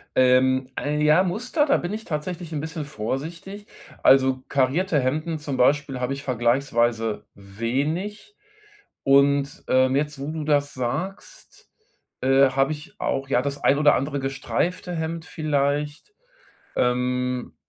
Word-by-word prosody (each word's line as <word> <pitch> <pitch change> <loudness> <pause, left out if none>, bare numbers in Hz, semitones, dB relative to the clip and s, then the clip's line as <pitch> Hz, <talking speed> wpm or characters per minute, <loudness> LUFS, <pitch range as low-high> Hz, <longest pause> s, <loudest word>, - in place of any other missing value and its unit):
Ähm, 130 0 +3
ein, 150 +1 -1
ja, 150 +4 +5
Muster, 245 - 0
da 280 - +3
bin 175 +4 -4
ich 220 +1 -6
tatsächlich 165 +2 -4
'n 150 - -2
bisschen 160 -1 -5
vorsichtig. 160 - -5 0.4
Also, 130 -1 +4
karierte 145 +5 +1
Hemden 155 +5 -1
zum 145 -3 -4
Beispiel 135 0 +2
habe 125 +2 -1
ich 135 +1 -7
vergleichsweise 120 -3 0
wenig. 140 - -3 0.7
Und, 140 +1 +3
ähm, 130 +1 +3
jetzt, 150 0 -1
wo 140 +3 -4
du 160 -1 -4
das 145 -1 +1
sagst, 170 - -6 0.5
äh, 135 +1 +5
habe 135 +2 +1
ich 150 0 -12
auch, 135 0 -2
ja, 125 - +3
das 140 +1 -4
ein 140 - +4
oder 150 -1 +5
andere 140 +1 -2
gestreifte 170 +7 -2
Hemd 160 0 -3
vielleicht. 150 - -2 0.6
Ähm, 125 0 0
140 Hz, 135 wpm, -24 LUFS, 130-160 Hz, 0.7 s, ja